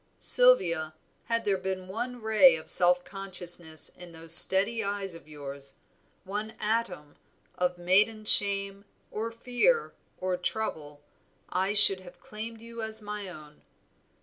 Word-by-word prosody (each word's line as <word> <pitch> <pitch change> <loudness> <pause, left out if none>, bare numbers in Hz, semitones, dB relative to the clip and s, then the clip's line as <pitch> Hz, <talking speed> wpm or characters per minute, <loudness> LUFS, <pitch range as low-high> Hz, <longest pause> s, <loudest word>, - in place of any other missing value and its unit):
Sylvia, 170 - +3 0.3
had 230 0 -2
there 195 -2 -1
been 185 0 -6
one 240 +4 -7
ray 220 +5 +4
of 155 - -3
self 180 0 +5
consciousness 175 -4 -3
in 175 -1 -15
those 165 0 +6
steady 200 +6 +6
eyes 200 -2 -5
of 165 -3 -14
yours, 140 -2 -8 0.5
one 210 +3 -7
atom 210 -9 -4 0.4
of 180 0 -2
maiden 205 +5 0
shame, 200 -1 +1 0.3
or 220 +2 -5
fear, 250 - -1 0.2
or 185 -1 -3
trouble, 155 -7 -6 0.5
I 190 +2 -2
should 200 -2 +6
have 180 -1 -16
claimed 220 +1 -9
you 230 0 -10
as 220 0 -5
my 210 -1 -8
own. 150 -3 -15
195 Hz, 135 wpm, -26 LUFS, 175-220 Hz, 0.5 s, those